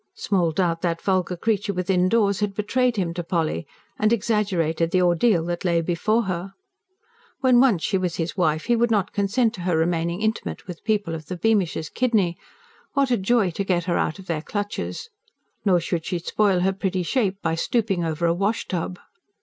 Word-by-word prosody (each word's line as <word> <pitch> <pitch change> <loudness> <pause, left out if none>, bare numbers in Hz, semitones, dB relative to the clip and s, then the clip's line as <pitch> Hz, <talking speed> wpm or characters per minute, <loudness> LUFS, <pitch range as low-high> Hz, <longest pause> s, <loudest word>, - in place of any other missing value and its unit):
Small 180 -5 +1
doubt 170 -1 0
that 170 -2 -1
vulgar 185 -2 0
creature 205 0 0
within 180 0 +1
doors 200 -3 +2
had 205 -2 -1
betrayed 245 +4 +1
him 180 -5 -1
to 175 0 -4
Polly, 160 - -1 0.3
and 215 +1 +3
exaggerated 190 -8 +1
the 180 +1 +2
ordeal 175 0 +3
that 175 0 -3
lay 170 -2 +2
before 180 +7 +1
her. 190 0 -4 0.9
When 255 -2 +5
once 240 -10 +4
she 195 - +1
was 180 -2 -2
his 165 0 -3
wife 160 -4 +1
he 240 - +3
would 235 +1 +2
not 205 -3 +1
consent 215 +3 +1
to 190 - -8
her 175 -2 +1
remaining 170 +1 0
intimate 220 +1 -2
with 180 -3 -9
people 205 -5 0
of 155 -2 -7
the 180 - -5
Beamishes' 190 -6 0
kidney: 215 -9 +1 0.5
what 275 -2 +2
a - - +5
joy 200 -1 +2
to 200 - -2
get 180 -3 0
her 175 -1 0
out - - -1
of 190 - -12
their 165 -4 -2
clutches! 205 - -4 0.5
Nor 185 -3 +4
should 170 0 -2
she 180 - -2
spoil 185 +2 +1
her 190 +1 +2
pretty 190 -1 -1
shape 200 -1 0
by 165 - +1
stooping 195 +1 0
over 165 +1 -1
a 170 - +3
wash 200 +6 -1
tub. 180 0 -3
185 Hz, 195 wpm, -23 LUFS, 170-210 Hz, 0.9 s, When